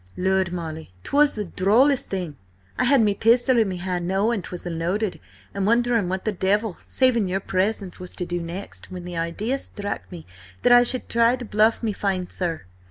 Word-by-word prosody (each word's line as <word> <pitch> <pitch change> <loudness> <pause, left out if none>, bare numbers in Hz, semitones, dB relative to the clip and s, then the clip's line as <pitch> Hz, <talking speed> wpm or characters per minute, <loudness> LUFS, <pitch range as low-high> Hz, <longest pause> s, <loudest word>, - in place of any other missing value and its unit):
"Lud, 190 -1 +1
Molly, 160 - -6
'twas 290 +1 +3
the 210 -1 -3
drollest 235 +10 +3
thing! 180 -6 -4 0.4
I - - +1
had 275 -3 +5
me 210 -2 +3
pistol 240 +4 +3
in 220 -3 +2
me 185 - -4
hand, 175 -1 -3
knowing 200 +3 +1
'twas 180 0 -8
unloaded, 175 +5 -2 0.3
and 200 0 -1
wondering 235 -4 +2
what 190 0 -3
the 215 - +1
devil, 205 +1 0
saving 245 -6 +2
your 185 +1 -1
presence, 195 0 -1
was 180 0 -9
to 180 - -3
do 175 0 -3
next, 170 +4 -7
when 180 -1 -7
the 180 -1 -6
idea 205 +11 -2
struck 205 -5 -5
me 170 -3 -9 0.4
that 245 - +4
I 245 - +8
should 245 +1 0
try 235 +1 +3
to 250 -1 -7
bluff 215 +2 +2
me 220 -2 0
fine 190 -3 -2
sir. 170 -3 -3
195 Hz, 195 wpm, -23 LUFS, 180-230 Hz, 0.4 s, I